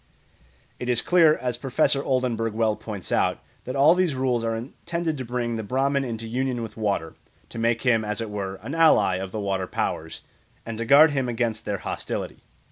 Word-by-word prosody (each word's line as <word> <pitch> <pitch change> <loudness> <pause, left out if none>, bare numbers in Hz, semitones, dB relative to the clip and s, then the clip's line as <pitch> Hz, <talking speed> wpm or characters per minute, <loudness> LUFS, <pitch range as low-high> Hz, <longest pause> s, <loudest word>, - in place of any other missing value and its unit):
It 125 - -4
is 120 -2 +3
clear, 165 -4 +5
as 125 -2 -2
Professor 135 +2 +1
Oldenberg 120 -4 0
well 110 -1 +1
points 105 -5 -7
out, - - +2 0.3
that 130 - -4
"all 145 +4 +6
these 180 -5 +1
rules 130 -3 0
are 115 0 -1
intended 160 +7 -4
to - - -3
bring 120 -1 -2
the 110 - -4
Brahman 135 +5 0
into 115 -3 -4
union 125 +1 -2
with 110 -1 -8
water, 100 -7 -2 0.4
to 115 - -7
make 115 0 +1
him, 115 -4 +3
as 105 -1 -3
it 115 -2 -4
were, 100 -2 -4
an 140 - -5
ally 105 - +4
of 95 0 -5
the 110 - -4
water 95 -2 -2
powers, - - -3 0.4
and 115 -1 -6
to 115 - -2
guard 145 +5 +7
him 135 -3 -1
against 115 -2 -2
their 105 -1 -1
hostility. - - -5
120 Hz, 200 wpm, -25 LUFS, 110-135 Hz, 0.4 s, guard